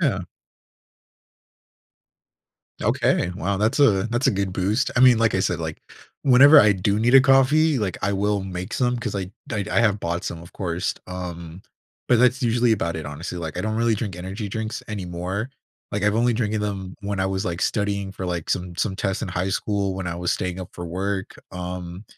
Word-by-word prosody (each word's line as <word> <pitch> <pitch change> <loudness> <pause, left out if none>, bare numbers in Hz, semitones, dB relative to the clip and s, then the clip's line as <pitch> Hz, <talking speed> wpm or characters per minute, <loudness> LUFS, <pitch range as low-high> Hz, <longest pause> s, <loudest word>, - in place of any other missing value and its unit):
Yeah. 125 - +1 2.6
Okay, 90 - +1
wow 100 0 -1
that's 110 +7 +1
a 100 -8 +4
that's 120 +3 0
a - - +5
good 95 -1 -2
boost. 100 +8 0
I - - +4
mean, 125 -3 +7
like 115 -3 +2
I 95 - +2
said, 95 - 0
like, 80 -1 -5 0.4
whenever 140 +3 +8
I 105 0 +5
do 100 +2 0
need 120 +4 +2
a 135 - +10
coffee, 135 +3 +4
like, 100 -4 -2
I 100 - +1
will 100 0 0
make 90 +2 -6
some 125 -1 +1
'cause 115 - -4
I 95 -1 -3 0.2
I 105 -2 -1
I - - +3
have 105 -3 +2
bought 85 +1 -2
some, 85 - -5
of 85 - -14
course, 90 -1 -2
um 90 -1 -7 0.5
but 120 - +5
that's 125 +1 +3
usually 120 0 +3
about 85 -6 -1
it, 80 - -5
honestly. 80 +5 -6
Like, 80 -3 -5
I - - -1
don't 110 0 -2
really 115 -1 +2
drink 100 -4 -4
energy 95 +4 -5
drinks 110 +2 -4
anymore. 95 +2 -4 0.4
Like, 100 0 -2
I've 105 0 +2
only 120 +1 +3
drinking 110 -2 -1
them 95 -3 -4
when 100 -1 -2
I 95 - +1
was, 95 +1 -2
like, 85 -2 -3
studying 100 -2 -1
for, 95 -2 -5
like, 85 -3 -3
some 90 -2 -2
some 95 -3 -1
tests 95 -2 -2
in - - -3
high 90 +2 -2
school 100 0 -1
when 95 -1 -4
I 85 - -3
was 90 0 0
staying 90 0 -3
up 90 - -8
for 85 -1 -7
work, 95 +3 -3 0.2
um 90 +1 -6
100 Hz, 205 wpm, -23 LUFS, 90-110 Hz, 2.6 s, a